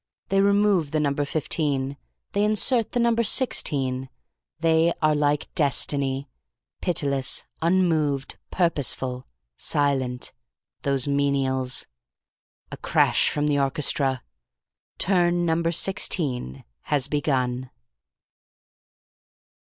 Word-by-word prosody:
They 195 0 +3
remove 200 -5 +3
the 155 - -1
number 145 -1 0
fifteen. 140 -2 -1 0.4
They 205 - +1
insert 215 +2 +2
the 245 - +1
number 235 -1 +2
sixteen. 135 - 0 0.5
They 165 +1 +3
are 155 -1 +3
like 145 0 0
Destiny 140 -2 +1 0.5
Pitiless, 140 -6 0 0.2
Unmoved, 160 -6 +1
Purposeful, 130 -7 -1 0.3
Silent. 135 -4 -1 0.5
Those 140 -1 0
menials. 135 -2 +1 0.9
"A - - -6
crash - - +2
from 145 0 -1
the 145 -1 +1
orchestra. 135 -2 +1 0.7
Turn 175 -2 +2
number 165 0 +1
sixteen 140 - -1 0.2
has 140 -3 0
begun...." 130 -4 -1
145 Hz, 90 wpm, -24 LUFS, 135-170 Hz, 0.9 s, They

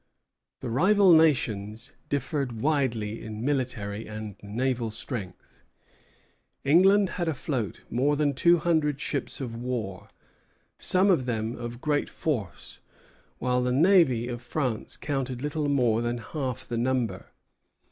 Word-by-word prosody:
The 125 - -4
rival 190 - +5
nations 125 -7 +2 0.2
differed 135 -4 -2
widely 120 -7 0
in 110 +1 -6
military 115 -7 -2
and 110 -2 -6
naval 120 +3 -1
strength. 110 -4 -7 1.0
England 190 +7 +5
had 170 - 0
afloat 130 - -2
more 140 +5 +1
than 145 -1 +1
two 170 +6 +4
hundred 155 -3 +1
ships 140 -1 -3
of 120 -4 -5
war, 115 -6 -4 0.7
some 190 +2 +3
of 130 -8 +1
them 115 0 -2
of 120 +1 -7
great 150 -2 0
force; 120 - -4 0.6
while 125 0 +1
the 125 0 0
navy 140 - +4
of 120 -1 -5
France 125 -2 -2
counted 135 -3 -3
little 150 0 -1
more 120 -5 +2
than 120 0 -1
half 130 +1 -5
the 120 - -2
number. 120 -6 -1
125 Hz, 125 wpm, -27 LUFS, 115-145 Hz, 1.0 s, rival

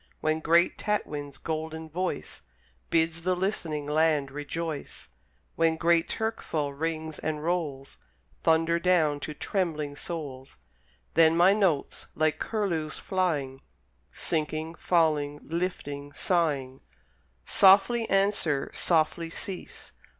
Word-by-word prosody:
When 155 0 0
great 170 +2 +3
Tatwin's 145 -10 -2
golden 160 +2 -4
voice 180 - -4 0.5
Bids 165 0 +1
the 185 +2 +1
listening 170 -6 -2
land 150 -2 +2
rejoice, 150 +1 -5 0.5
When 165 -1 +3
great 170 0 +3
Turkeful 165 -10 -2
rings 160 +1 -3
and 150 -1 -3
rolls 155 -6 -3 0.4
Thunder 165 +1 +3
down 165 -5 +2
to 150 +1 -6
trembling 155 -6 -2
souls, 145 -5 -6 0.6
Then 165 0 +5
my 180 +3 +6
notes, 190 -9 0
like 155 0 +1
curlews 170 -8 -1
flying, 150 -9 -1 0.5
Sinking, 155 0 -2
falling, 155 -4 +1
lifting, 145 -4 -4
sighing, 145 -6 0 0.6
Softly 200 +4 +5
answer, 195 -8 +1
softly 165 0 +1
cease. 185 +2 -6
160 Hz, 105 wpm, -28 LUFS, 150-175 Hz, 0.6 s, my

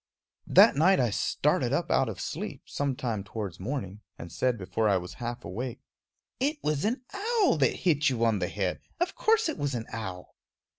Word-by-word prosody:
That - - +7
night 180 +7 +4
I 120 -4 +2
started - - +1
up - - 0
out - - +3
of - - -6
sleep, - - -5
some 140 -2 -2
time 115 -6 -3
towards 100 -2 -6
morning, 105 -2 -4 0.2
and 85 - -9
said 125 -2 0
before 105 +3 0
I 100 - +4
was 90 0 -6
half 120 +1 -4
awake: 120 +6 -5 0.6
"It 290 +4 +1
was 150 +1 0
an 245 +4 -1
owl 420 - +2
that 135 -3 +3
hit 155 -5 +3
you 115 -3 +1
on 110 -3 +2
the 90 - 0
head 95 -3 -2 0.2
of 350 +1 0
course 450 -4 +2
it 315 - -3
was 145 -2 -1
an 115 -1 -3
owl!" 95 -5 -6
125 Hz, 195 wpm, -28 LUFS, 105-165 Hz, 0.6 s, That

